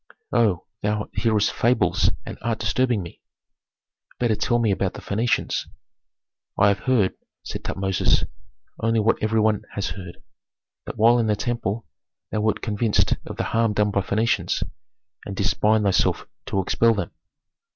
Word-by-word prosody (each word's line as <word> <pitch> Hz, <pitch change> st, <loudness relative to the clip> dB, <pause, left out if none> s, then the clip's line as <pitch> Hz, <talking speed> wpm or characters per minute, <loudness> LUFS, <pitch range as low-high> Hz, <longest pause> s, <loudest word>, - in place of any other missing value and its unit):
"Oh, 100 Hz, -8 st, +2 dB, 0.2 s
thou 105 Hz, 0 st, -1 dB
hearest 105 Hz, -1 st, +2 dB
fables 120 Hz, +2 st, +2 dB, 0.2 s
and -, -, -6 dB
art 115 Hz, -1 st, -1 dB
disturbing 110 Hz, 0 st, +1 dB
me. 85 Hz, -, -11 dB, 1.0 s
Better 120 Hz, -3 st, +1 dB
tell 120 Hz, -, +1 dB
me 115 Hz, -3 st, +2 dB
about 95 Hz, -1 st, -1 dB
the -, -, -6 dB
Phœnicians." 115 Hz, +4 st, -1 dB, 0.9 s
"I 100 Hz, 0 st, +5 dB
have 100 Hz, -, +1 dB
heard," 110 Hz, -8 st, +3 dB, 0.3 s
said -, -, -6 dB
Tutmosis, 95 Hz, -1 st, +1 dB, 0.6 s
"only 115 Hz, 0 st, +2 dB
what 110 Hz, +1 st, +2 dB
every 110 Hz, +1 st, +1 dB
one 110 Hz, -1 st, +2 dB
has 100 Hz, -, -1 dB
heard, 90 Hz, -3 st, -8 dB, 0.7 s
that -, -, -6 dB
while 115 Hz, +3 st, +5 dB
in 115 Hz, -, +1 dB
the 105 Hz, -, +2 dB
temple 115 Hz, -1 st, -2 dB, 0.5 s
thou 110 Hz, -, 0 dB
wert 110 Hz, 0 st, 0 dB
convinced 110 Hz, 0 st, +2 dB
of -, -, -7 dB
the -, -, 0 dB
harm 115 Hz, -1 st, +2 dB
done 105 Hz, 0 st, +2 dB
by 100 Hz, -, +1 dB
Phœnicians, 110 Hz, +5 st, 0 dB, 0.6 s
and 100 Hz, -, -5 dB
didst 100 Hz, 0 st, -1 dB
bind 110 Hz, 0 st, +4 dB
thyself 95 Hz, -2 st, +2 dB, 0.2 s
to 95 Hz, -, 0 dB
expel 115 Hz, +4 st, +3 dB
them." 100 Hz, -5 st, -3 dB
105 Hz, 155 wpm, -23 LUFS, 100-115 Hz, 1.0 s, I